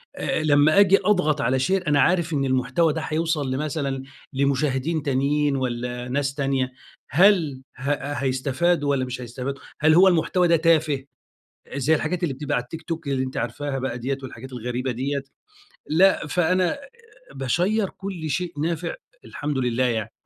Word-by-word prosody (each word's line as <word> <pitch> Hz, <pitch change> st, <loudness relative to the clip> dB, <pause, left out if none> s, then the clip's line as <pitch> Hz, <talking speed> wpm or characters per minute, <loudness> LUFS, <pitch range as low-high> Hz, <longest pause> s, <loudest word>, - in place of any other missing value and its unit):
أ -, -, -1 dB
أ -, -, -3 dB
لمّا 150 Hz, +4 st, +5 dB
أجي 195 Hz, -1 st, +6 dB
أضغط 170 Hz, -8 st, +2 dB
على 130 Hz, +2 st, +1 dB
شير 180 Hz, +5 st, 0 dB
أنا 145 Hz, -1 st, +4 dB
عارف 170 Hz, -3 st, +2 dB
إن 140 Hz, -2 st, +1 dB
المحتوى 130 Hz, +5 st, +1 dB
ده 160 Hz, -, -3 dB
هيوصل 155 Hz, -4 st, -1 dB
لمثلًا 140 Hz, -1 st, -2 dB, 0.3 s
لمشاهدين 140 Hz, +3 st, 0 dB
تانيين 140 Hz, +1 st, +1 dB
والّا 125 Hz, -1 st, -3 dB
ناس 140 Hz, +1 st, -1 dB
تانية، 135 Hz, -2 st, 0 dB, 0.4 s
هل 160 Hz, -, +4 dB, 0.2 s
ه 135 Hz, +3 st, -2 dB, 0.2 s
هيستفادوا 145 Hz, +4 st, 0 dB
والّا 135 Hz, -2 st, +1 dB
مش 125 Hz, 0 st, -6 dB
هيستفادوا؟ 125 Hz, +3 st, -5 dB, 0.2 s
هل 155 Hz, +1 st, +5 dB
هو 180 Hz, +4 st, +7 dB
المحتوى 175 Hz, 0 st, +3 dB
ده 170 Hz, -, +5 dB
تافه 155 Hz, -4 st, +2 dB, 0.7 s
زي 140 Hz, +3 st, +2 dB
الحاجات 160 Hz, +3 st, -2 dB
اللي 145 Hz, -6 st, 0 dB
بتبقى 145 Hz, +1 st, -3 dB
على 125 Hz, -, 0 dB
التيك 160 Hz, +7 st, -9 dB
توك 165 Hz, -2 st, -5 dB
اللي 130 Hz, -1 st, 0 dB
أنتِ 130 Hz, -, -6 dB
عارفاها 135 Hz, +3 st, -3 dB
بقى 130 Hz, -2 st, -3 dB
ديّة 135 Hz, +3 st, -2 dB
والحاجات 130 Hz, 0 st, -9 dB
الغريبة 125 Hz, +1 st, -3 dB
ديّة؟ 135 Hz, +3 st, -2 dB, 0.7 s
لأ. 175 Hz, 0 st, +4 dB
فأنا 180 Hz, -, +1 dB, 0.6 s
باشيّر 180 Hz, -, 0 dB
كل 185 Hz, -5 st, -6 dB
شيء 175 Hz, +3 st, -2 dB
نافع 165 Hz, +2 st, -2 dB, 0.3 s
الحمد 145 Hz, -1 st, -4 dB
لله 125 Hz, -1 st, 0 dB
يعني. 110 Hz, -3 st, -1 dB
145 Hz, 160 wpm, -24 LUFS, 130-165 Hz, 0.7 s, هو